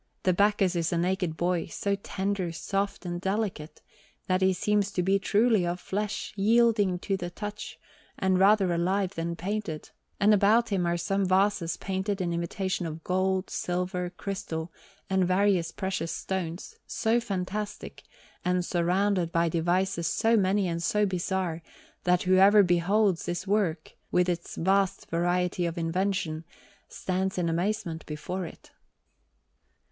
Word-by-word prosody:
The 185 - +3
Bacchus 200 -1 +2
is 165 -1 0
a 170 - +1
naked 180 -2 -1
boy, 175 -1 0
so 200 +4 -1
tender, 195 -2 -2
soft, 195 +5 -3
and 175 0 -4
delicate, 190 -6 -3 0.4
that 185 0 +1
he 190 0 +4
seems 200 +2 +1
to 180 - 0
be 195 +2 +3
truly 215 0 +3
of 175 +1 -2
flesh, 205 +3 -3
yielding 210 -2 +3
to 195 - -1
the 175 -2 -4
touch, 210 +3 -7 0.4
and 190 -1 +2
rather 195 -2 +4
alive 185 +3 0
than 170 +1 -3
painted; 185 -3 -4 0.3
and 210 +1 +5
about 215 +4 +4
him 185 -4 0
are 170 0 +1
some 195 +2 0
vases 185 -2 +2
painted 195 +1 -2
in 175 -2 -1
imitation 175 +1 -2
of 160 0 -7
gold, 185 +1 0
silver, 180 0 -2
crystal, 175 -3 -5 0.4
and 190 -1 +2
various 185 -2 +2
precious 190 -4 -3
stones, 185 - -4
so 225 +1 +1
fantastic, 205 -1 -4 0.4
and 180 0 +1
surrounded 180 0 +1
by 170 0 +2
devices 175 +1 0
so 225 +1 +2
many 195 -1 +2
and 170 -1 -2
so 210 +4 +2
bizarre, 185 -2 -2 0.4
that 180 0 +3
whoever 195 +3 +6
beholds 180 +2 +2
this 175 +2 -3
work, 190 -6 0 0.2
with 180 0 +3
its 175 -1 -3
vast 195 +2 +1
variety 175 +1 +1
of 170 +1 -5
invention, 170 -1 -1 0.5
stands 190 +1 -2
in 175 -2 0
amazement 175 0 -1
before 170 +4 -4
it. - - -14
185 Hz, 145 wpm, -28 LUFS, 175-200 Hz, 0.5 s, whoever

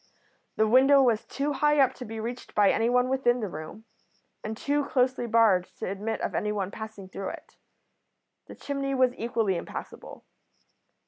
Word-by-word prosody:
The 220 - +2
window 270 +5 +6
was 230 -4 +1
too 285 +2 -2
high 295 +1 +2
up 265 -2 +4
to 250 - -9
be 220 +1 -7
reached 240 +3 -6
by 205 -1 +5
anyone 245 +2 +2
within 255 -2 +1
the 215 - -3
room, 175 +6 -9 0.6
and 220 0 -5
too 290 +3 0
closely 255 -2 0
barred 220 -6 +4
to - - -4
admit 210 +3 -3
of - - -2
anyone 205 -2 -2
passing 220 -3 -8
through 190 0 -5
it. - - -11 0.9
The - - -10
chimney 275 -1 -3
was 255 -1 +3
equally 225 -5 -1
impassable. - - -8
230 Hz, 165 wpm, -27 LUFS, 210-260 Hz, 0.9 s, window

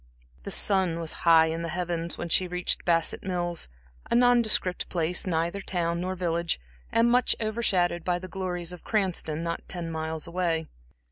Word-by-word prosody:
The - - -4
sun 185 -4 +2
was 165 -1 0 0.2
high 160 -1 +8
in 160 +1 -2
the 170 - -3
heavens 170 -1 -2
when 175 - -4
she 180 +2 +2
reached 180 0 -1
Bassett 165 -1 +2
Mills, 175 - -1 0.4
a - - +2
nondescript 235 -6 +3
place, 175 +1 0
neither 170 +3 -1
town 170 -2 -1
nor 185 +1 -2
village, 170 - -1 0.3
and 230 +1 +3
much 250 0 +3
over 220 +1 -2
shadowed 175 -5 +1
by 180 -1 +1
the 185 +1 -8
glories 180 -2 -3
of 180 - -11
Cranston, 180 -7 0
not 170 0 -3
ten 170 -3 -4
miles 160 -1 -3
away. 170 -2 -1
175 Hz, 175 wpm, -27 LUFS, 165-185 Hz, 0.4 s, high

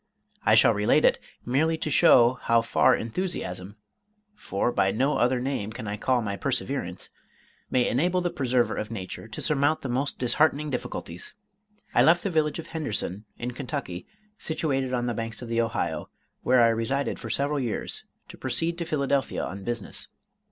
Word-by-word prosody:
I - - +5
shall 115 - +6
relate 105 0 +3
it, - - +4 0.3
merely 155 +6 +1
to 155 - -3
show 125 -2 +6
how 115 0 +3
far 115 - +4
enthusiasm 110 - -4 0.6
for 120 - -1
by 95 - +2
no 135 +8 +1
other 125 +1 +2
name 125 -5 -2
can 110 -1 -7
I 100 - -2
call 125 +3 +1
my 100 -2 -2
perseverance 95 - -2 0.6
may 125 -1 +2
enable 175 +8 +1
the 175 -1 -1
preserver 125 -3 +1
of 105 - -4
nature 100 -1 -6
to 115 - -7
surmount 145 +1 +2
the 135 - -4
most 135 +4 -1
disheartening 145 +4 +2
difficulties. 90 -8 -5 0.6
I - - +5
left 170 +2 +5
the 200 - -1
village 155 -2 +1
of 165 - -6
Henderson, 110 - -3
in 120 +1 -4
Kentucky, 125 - -5 0.3
situated 135 -5 -1
on 120 -1 0
the 120 - -1
banks 115 +1 -5
of 120 - -8
the 115 0 +2
Ohio, 115 -1 -2 0.3
where 125 -1 +4
I 115 - +6
resided 115 +5 -1
for 115 - -7
several 140 +5 0
years, 120 -5 -3 0.3
to - - -12
proceed 170 +1 -1
to 170 - -2
Philadelphia 140 -3 0
on 100 +1 -6
business. 120 0 -3
125 Hz, 175 wpm, -26 LUFS, 115-145 Hz, 0.6 s, shall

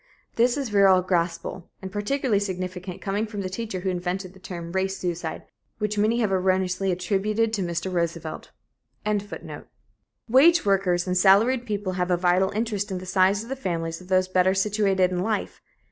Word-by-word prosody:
This 240 +3 +3
is 275 -4 -2
virile 195 -3 +5
gospel, 175 0 -2
and 190 -1 -7
particularly 215 +2 0
significant 185 -2 -5
coming 205 +3 -1
from 210 -2 -5
the 185 - -3
teacher 195 -1 -4
who 190 0 -1
invented 180 +1 -3
the 190 - -16
term 170 -2 -7
'race 190 +1 -1
suicide,' 175 -3 -4 0.3
which 210 -1 -2
many 215 +3 +2
have 210 -3 +1
erroneously 185 0 +1
attributed 210 +5 0
to 205 - 0
Mr. 175 +1 -3
Roosevelt."] 170 -2 -3 1.8
Wage 285 +7 +5
workers 185 -3 +2
and 180 -1 -1
salaried 220 +7 +4
people 205 -3 -2
have 180 0 -1
a 180 - +3
vital 180 +2 +2
interest 210 -1 -2
in 190 - -3
the 185 - -7
size 190 +2 +2
of 230 - -12
the 270 - -2
families 165 -8 -3
of 180 - -13
those 185 0 +2
better 185 0 +2
situated 195 -2 +2
in 180 - -1
life. 210 +3 -2
190 Hz, 175 wpm, -25 LUFS, 180-210 Hz, 1.8 s, virile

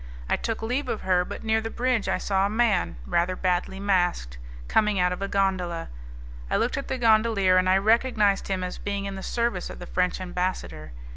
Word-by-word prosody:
I - - +2
took 225 -1 -3
leave 250 +4 -1
of 220 - -2
her, 180 -1 +2
but - - -8
near 220 0 +1
the 225 - -4
bridge 245 -2 0
I - - +1
saw 195 0 +1
a - - -4
man, 215 - +1
rather 175 - 0
badly 185 +1 -1
masked, 175 - 0 0.3
coming 210 -2 +2
out 180 0 +2
of 180 - -7
a 195 - -1
gondola. 185 -4 -1 0.6
I - - +1
looked 235 - 0
at 275 - -4
the 265 - -2
gondolier, 215 -5 +3
and 185 0 +3
I 190 - +5
recognized 215 -1 +2
him 190 -2 -2
as 180 - -5
being 200 -1 -3
in 195 - -4
the 190 - -6
service 235 -4 -2
of - - -8
the 175 - -8
French 180 +1 0
ambassador. 180 - -4
195 Hz, 210 wpm, -25 LUFS, 180-220 Hz, 0.6 s, I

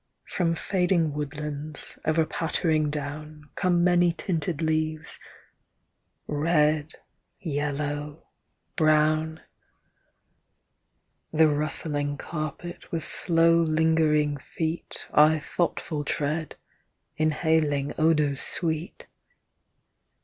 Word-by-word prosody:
From 165 -2 0
fading 180 -4 +1
woodlands, 150 0 -4
ever 160 0 +2
pattering 155 -1 0
down, 150 +1 -6
Come 175 -2 +2
many 175 -1 +4
tinted 165 -2 -2
leaves— 155 0 -1 1.1
red, 150 0 +1 0.5
yellow, 145 -2 -3 0.5
brown; 155 0 +2 1.9
The 160 0 +5
rustling 145 -1 -1
carpet 155 +3 -6
with 165 -2 -2
slow 165 -1 +3
lingering 155 -2 +2
feet 160 +4 -5
I 155 +1 +6
thoughtful 155 -1 -2
tread, 150 +2 -2 0.6
inhaling 155 -2 +1
odours 150 -3 +2
sweet. 165 0 -2
155 Hz, 75 wpm, -26 LUFS, 150-165 Hz, 1.9 s, I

